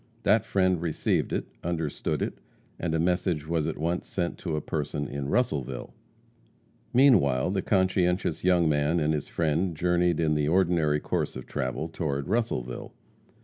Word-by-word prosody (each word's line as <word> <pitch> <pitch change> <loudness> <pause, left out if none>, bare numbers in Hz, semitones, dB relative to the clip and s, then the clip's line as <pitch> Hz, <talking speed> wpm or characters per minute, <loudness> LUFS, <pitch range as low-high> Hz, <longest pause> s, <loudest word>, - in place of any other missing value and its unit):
That - - +3
friend 95 -3 +2
received 85 -3 0
it, - - -1 0.2
understood 80 -3 -2
it, - - -4 0.4
and 80 -2 -1
a - - +1
message 85 -2 0
was 80 -2 0
at - - -3
once 85 +3 -2
sent 85 -2 -3
to 80 -4 -3
a - - 0
person 75 -2 -3
in 70 0 -4
Russellville. 70 - -1 1.0
Meanwhile, 95 - +4
the 95 -1 0
conscientious 95 -4 +1
young 90 -2 +4
man 75 +2 +2
and 75 0 +1
his 75 - -2
friend 80 +1 0
journeyed 90 0 +2
in 80 -2 +2
the 75 -1 +1
ordinary 85 -3 +2
course - - -2
of 65 - -7
travel 65 +2 -3
toward 75 -3 -3
Russellville. 100 - -2
80 Hz, 155 wpm, -27 LUFS, 75-90 Hz, 1.0 s, Meanwhile